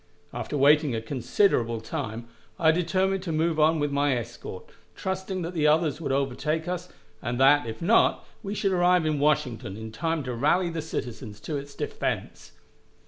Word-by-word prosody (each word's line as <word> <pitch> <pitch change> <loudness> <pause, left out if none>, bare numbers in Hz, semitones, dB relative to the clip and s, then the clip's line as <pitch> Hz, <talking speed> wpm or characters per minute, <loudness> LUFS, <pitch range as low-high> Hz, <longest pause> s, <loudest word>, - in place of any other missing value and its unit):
After 120 +5 -3
waiting 145 -1 +4
a - - -1
considerable 120 - +1
time, 110 +1 -5 0.3
I 160 -1 +5
determined 185 +3 +1
to 180 -3 -4
move 160 0 +1
on 160 +2 +4
with 145 -1 0
my 140 -2 +2
escort, 115 -5 -8 0.2
trusting 190 -1 -3
that 170 +2 -4
the 155 -3 +2
others 155 0 +2
would 150 - -2
overtake 140 +4 -1
us, 180 0 -4 0.3
and 120 +2 -3
that, 135 -1 +5
if 110 +7 -6
not, 225 +7 +3 0.2
we 205 -1 -4
should 195 -1 0
arrive 180 -2 +3
in 155 -2 0
Washington 130 -8 0
in 110 0 -7
time 160 +6 -2
to 125 -1 -4
rally 170 +8 +2
the 165 -1 -3
citizens 110 -8 -6
to 155 - -4
its 140 0 -6
defense. - - -4
150 Hz, 175 wpm, -26 LUFS, 125-170 Hz, 0.3 s, I